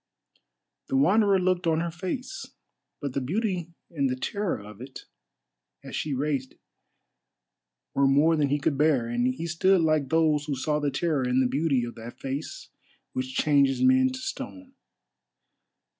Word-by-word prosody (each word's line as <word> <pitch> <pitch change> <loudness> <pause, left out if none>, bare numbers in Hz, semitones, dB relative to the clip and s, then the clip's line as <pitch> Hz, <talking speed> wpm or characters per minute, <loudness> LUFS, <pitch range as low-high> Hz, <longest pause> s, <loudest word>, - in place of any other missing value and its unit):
The 135 - 0
Wanderer 200 +7 +4
looked 180 -1 +1
on 160 -1 +2
her 170 0 -2
face, 245 - -6 0.5
but 140 -3 -3
the 140 - -1
beauty 175 - -2 0.2
and 140 -5 0
the 130 - -1
terror 200 +8 -2
of 105 +2 -12
it, 130 +1 -9 0.8
as - - -7
she 145 -3 -2
raised 135 -1 -2
it, - - -32 1.3
were 140 0 +3
more 145 +4 +4
than 145 -3 +1
he 145 - +2
could 140 -1 -1
bear, 150 -6 +3
and 120 +1 0
he 160 - -5
stood 175 +2 +3
like 155 -4 +1
those 155 -2 +2
who 145 -2 -2
saw 150 +3 -1
the 145 -1 0
terror 150 +1 0
and 125 0 +1
the 130 - +3
beauty 140 -2 +1
of 120 0 -5
that 115 +1 -10
face 135 +3 -5 0.4
which 130 0 -4
changes 140 - +3
men 260 0 +5
to 260 - -5
stone. 280 -5 -7
150 Hz, 165 wpm, -26 LUFS, 135-175 Hz, 1.3 s, men